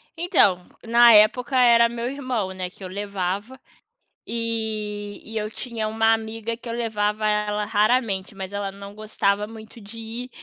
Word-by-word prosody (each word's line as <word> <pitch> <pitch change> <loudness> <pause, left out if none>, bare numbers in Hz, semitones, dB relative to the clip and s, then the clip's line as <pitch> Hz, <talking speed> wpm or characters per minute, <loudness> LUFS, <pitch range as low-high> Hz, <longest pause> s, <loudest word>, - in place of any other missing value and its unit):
Então, 310 - +2 0.2
na 235 +1 +7
época 240 +5 +4
era 235 -2 +6
meu 235 0 -4
irmão, 255 -8 -3
né, 185 -1 -4
que 190 - -15
eu - - -5
levava 200 +4 -4 0.7
e 215 -3 -3
e 225 0 -7
eu 215 0 -2
tinha 230 -2 -4
uma 225 +1 +3
amiga 225 +1 -3
que 240 - -12
eu 230 - -3
levava 215 -2 -1
ela 210 0 0
raramente, 210 -2 +1
mas 190 -1 -6
ela 200 -1 -3
não 200 +1 -10
gostava 210 -1 0
muito 220 +1 -12
de 215 +2 -11
ir, 230 +3 -7
220 Hz, 160 wpm, -23 LUFS, 205-235 Hz, 0.7 s, na